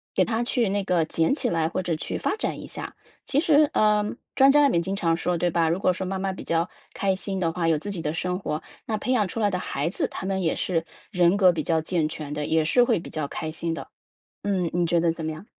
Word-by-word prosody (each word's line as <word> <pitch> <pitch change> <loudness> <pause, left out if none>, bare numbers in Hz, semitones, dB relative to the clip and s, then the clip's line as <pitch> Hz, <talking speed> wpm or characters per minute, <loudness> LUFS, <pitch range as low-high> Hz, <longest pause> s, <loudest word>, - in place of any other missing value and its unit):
给 - - +4
它 230 0 0
去 240 -3 +1
那 200 +1 0
个 180 -3 +2
捡 165 +6 +1
起 - - -1
来 165 -2 +1
或 185 - -2
者 175 -2 -1
去 155 - -4
发 - - 0
展 - - -1
一 - - -8
下。 - - -7 0.3
其 280 - +1
实， 305 -3 +5
呃， 210 -1 +3 0.3
专 270 +1 +7
家 295 +1 +5
里 275 - +3
面 170 - +2
经 195 +2 -2
常 165 -4 +1
说 175 0 0
对 175 - +2
吧： 165 -1 +2
“如 170 +3 0
果 185 - +3
说 185 +1 -3
妈 190 +1 -2
妈 195 0 -1
比 190 - -8
较 165 +1 0 0.2
开 195 -1 +1
心 195 0 -3
的 165 -2 +1
话， 165 0 -1
有 160 -2 +3
自 205 - -5
己 190 - -3
的 150 - -1
生 180 +2 -1
活， 155 -5 -3 0.2
那 220 - -1
培 255 - -2
养 220 -6 +3
出 230 - -5
来 205 - +3
的 180 - 0
孩 145 -3 -2
子 - - -1
他 - - -7
们 190 -1 -1
也 160 - +1
是 165 -3 -1 0.3
人 180 -2 +4
格 190 -3 +6
比 165 -2 -2
较 160 +1 +1
健 160 -1 0
全 155 -1 -6
的， 150 0 -2
也 160 +1 +2
是 245 +11 +4
会 235 -6 +2
比 - - -9
较 155 -2 -3
开 160 +2 -4
心 165 +1 -3
的。” 165 - -6 0.6
嗯， 190 -4 0
你 175 0 +2
觉 170 0 +2
得 170 0 +2
怎 165 -1 -6
么 160 - -2
样？ 155 +6 -10
180 Hz, 300 characters per minute, -25 LUFS, 165-200 Hz, 0.6 s, 专